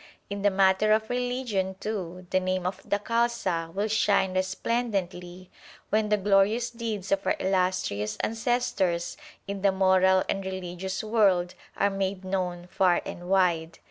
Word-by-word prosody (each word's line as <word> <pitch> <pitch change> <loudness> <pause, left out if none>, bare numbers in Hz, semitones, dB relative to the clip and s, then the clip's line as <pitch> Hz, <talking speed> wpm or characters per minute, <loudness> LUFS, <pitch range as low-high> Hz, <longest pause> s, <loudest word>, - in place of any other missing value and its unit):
In 200 0 -3
the 205 - +4
matter 195 +2 +3
of 220 +2 0
religion, 245 -6 -1
too, 185 -4 -5
the 185 - +3
name 185 -1 -1
of 190 +1 -3
the 205 - 0
Khalsa 210 -7 -1
will 200 +4 -1
shine 205 -3 +2
resplendently 185 -2 -2 0.4
when 215 0 +2
the 210 - +3
glorious 205 +4 +2
deeds 220 -5 -4
of 195 0 +2
our - - +3
illustrious 180 - 0
ancestors 225 -7 0 0.3
in 200 -1 -4
the 200 0 +4
moral 190 0 +4
and 195 - -2
religious 190 0 -4
world 195 -5 +2 0.2
are 200 0 +2
made 195 -1 -2
known 180 -2 -2
far 180 -1 +2
and 175 +1 -7
wide. 170 -4 +2
190 Hz, 145 wpm, -27 LUFS, 185-210 Hz, 0.4 s, the